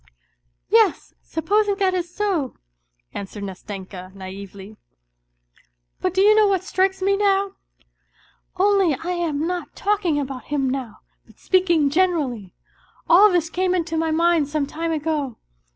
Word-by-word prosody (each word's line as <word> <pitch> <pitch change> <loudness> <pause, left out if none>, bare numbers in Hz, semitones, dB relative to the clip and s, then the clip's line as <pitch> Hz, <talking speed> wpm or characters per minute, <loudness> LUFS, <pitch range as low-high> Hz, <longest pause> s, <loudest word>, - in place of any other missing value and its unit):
:< - - -51 0.3
Yes, 440 -3 +2
supposing 405 +6 0
that 385 -2 +1
is 350 -2 -2
so," 360 -10 -1 0.6
answered 200 +1 -7
Nastenka 190 -1 -8
naively. 195 +2 -10 0.6
" - - -38
But 370 -1 -1
do 380 - +3
you 420 +2 +6
know 430 -1 +5
what 380 -2 +1
strikes 380 0 0
me 395 +1 +3
now? 395 -1 +2 1.1
Only 385 -5 +3
I 340 +7 -5
am 325 -4 -1
not 355 0 -4
talking 395 -7 0
about 270 -2 -5
him 285 -2 -1
now, 255 -4 -4 0.3
but - - -21
speaking 345 -6 +2
generally; 290 - 0 0.5
all 390 +5 +7
this 335 -3 0
came 370 0 0
into 335 -2 -2
my 320 0 0
mind 330 -1 +2
some 295 0 -1
time 325 +4 -4
ago. 300 -5 -2
330 Hz, 145 wpm, -22 LUFS, 265-375 Hz, 1.1 s, all